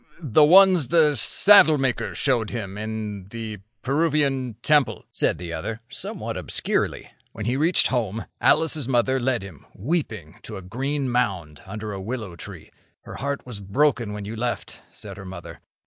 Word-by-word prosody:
"The 150 -2 +3
ones 180 -2 +6
the 155 -3 +4
saddlemaker 150 - +4
showed 120 -6 +1
him 100 -5 -5
in 105 -2 -5
the 110 -1 -6 0.2
Peruvian 140 -4 +1
temple," 150 -2 +2
said - - +1
the 85 -1 -7
other, 110 +8 -4
somewhat - - -6
obscurely. - - -2 0.2
"When 110 -2 -6
he 120 +3 0
reached 160 +6 +3
home, 115 -4 -2 0.2
Alice's 155 -5 +2
mother 130 +1 +2
led 125 -4 0
him, 90 -8 -12
weeping, 110 - -3
to - - -8
a 95 - -9
green 135 +8 -2
mound 95 -11 -1
under 105 +2 -6
a 95 - -6
willow 105 -4 -5
tree. 85 - -11 0.3
'Her - - -9
heart 140 0 -3
was 120 -5 -5
broken 115 +3 +1
when 105 -1 -6
you 110 +3 -6
left,' 120 +1 -4
said 100 -2 -10
her 95 - -9
mother. 95 -2 -10
120 Hz, 160 wpm, -23 LUFS, 105-140 Hz, 0.3 s, ones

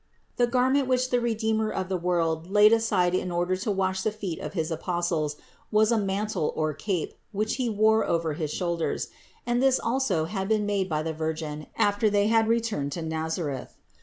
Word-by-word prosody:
The 245 - +3
garment 260 +2 +2
which 255 0 +1
the 245 - +3
Redeemer 220 -2 0
of 190 -2 -3
the 190 - -1
world 170 -2 0
laid 210 +2 +6
aside 205 -6 +2
in 185 0 0
order 175 +1 0
to 210 +4 -3
wash 190 -1 0
the 215 - 0
feet 200 -6 -5
of - - -6
his 165 -3 -2
Apostles, 165 -2 -1 0.4
was 215 +1 +4
a 230 - +3
mantle 200 -4 -1
or 155 -1 0
cape, 175 +3 -2 0.2
which 215 +1 -1
He 250 -3 0
wore 220 +1 +3
over 165 -2 0
his 155 0 -3
shoulders; 170 -1 -2 0.4
and 240 0 +1
this 265 -1 +4
also 230 -10 0
had 190 +2 -3
been 215 -1 +1
made 200 -2 0
by 155 -1 -1
the 160 0 -2
Virgin 155 -1 -4
after 205 +1 +3
they 205 0 +2
had 225 -1 +3
returned 225 -12 0
to 170 - -4
Nazareth. 160 -3 -3
195 Hz, 195 wpm, -26 LUFS, 165-220 Hz, 0.4 s, laid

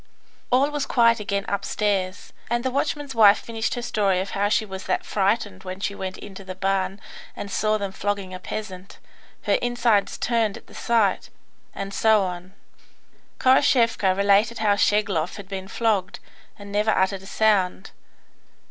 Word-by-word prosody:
All 270 +4 +3
was 295 -1 -2
quiet 230 -1 +4
again 200 -1 -2
upstairs, 200 -1 -2 0.2
and 240 +1 0
the 260 - +1
watchman's 285 +1 -2
wife 210 -2 +7
finished 225 -1 -3
her 245 - -5
story 200 -5 +1
of 190 +1 -4
how 200 +1 0
she 215 - +2
was 190 -2 -8
that - - -1
frightened 195 - -1
when 185 +1 -6
she 200 - -2
went 190 -1 -5
into 195 -1 -10
the 185 -1 -7
barn 190 +1 -1 0.4
and 200 - -7
saw 215 +2 +1
them 200 -2 -4
flogging 200 -1 -3
a 185 - -6
peasant, 190 -1 -7 0.5
her - - +2
inside 240 -4 +2
turned 230 -4 -1
at - - -15
the - - -18
sight, 225 -5 +1 0.5
and 195 0 -5
so 220 -1 +4
on. 180 +1 -6 0.8
Khoroshevka 240 -7 +3
related 200 +3 +3
how 210 -2 +2
Schegloff 200 -5 +1
had 200 -2 -9
been 190 -1 -6
flogged, 205 -4 0 0.4
and 205 -1 -10
never 210 +2 +1
uttered 190 -2 +1
a 190 - -12
sound. 195 -4 +1
205 Hz, 165 wpm, -24 LUFS, 190-225 Hz, 0.8 s, wife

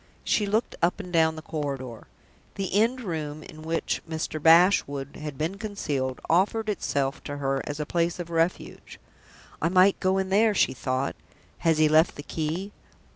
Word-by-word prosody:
She 210 - +1
looked 215 +4 0
up 175 +3 +2
and 180 -3 -8
down 160 -1 +3
the 155 - -8
corridor. 135 -7 -5 0.5
The 195 -2 -3
end 230 +5 +2
room, 155 -6 -4
in 155 +1 -12
which 165 +1 -2
Mr. 160 -1 -3
Bashwood 160 -5 +4
had 150 -3 -6
been 165 +7 -3
concealed, 145 - -3
offered 210 +6 +2
itself 140 -7 -1
to 145 -1 -5
her 135 -1 -1
as 145 +1 -4
a 150 - -2
place 170 +2 0
of 175 -1 -6
refuge. 165 +2 -2 0.6
"I 165 - +2
might 185 +2 +4
go 190 0 +1
in 190 0 -1
there!" 210 +2 +3
she 130 - +3
thought. 130 +1 -2 0.4
"Has 165 -2 +2
he 155 0 +5
left 155 +2 +4
the 145 - -8
key?" 165 +7 -3
165 Hz, 175 wpm, -26 LUFS, 145-190 Hz, 0.6 s, he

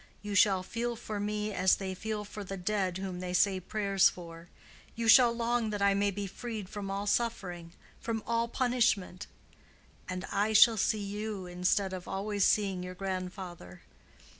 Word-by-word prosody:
You 210 0 -4
shall 190 -1 +4
feel 235 +4 -3
for 215 -2 -5
me 210 +1 -2
as 185 -1 +4
they 190 -1 -4
feel 210 +2 -4
for 205 0 -7
the 195 0 -6
dead 190 -1 -1
whom 190 -2 -5
they 180 0 -4
say 190 +1 +3
prayers 195 0 +2
for—you 170 +6 -10
shall 240 +1 +8
long 235 -1 0
that 205 -1 -3
I 200 0 +4
may 200 +1 +2
be 200 +1 -4
freed 215 0 -6
from 205 -2 -6
all 200 +1 -3
suffering—from 205 0 -3
all 230 0 0
punishment. 235 -7 0 0.8
And 185 +1 -4
I 210 +2 +1
shall 225 +1 +7
see 210 +1 +1
you 205 -1 -4
instead 180 +2 0
of 185 -1 -7
always 200 +1 -1
seeing 195 -3 +2
your 180 0 -7
grandfather. 185 - -6
200 Hz, 165 wpm, -30 LUFS, 185-215 Hz, 0.8 s, shall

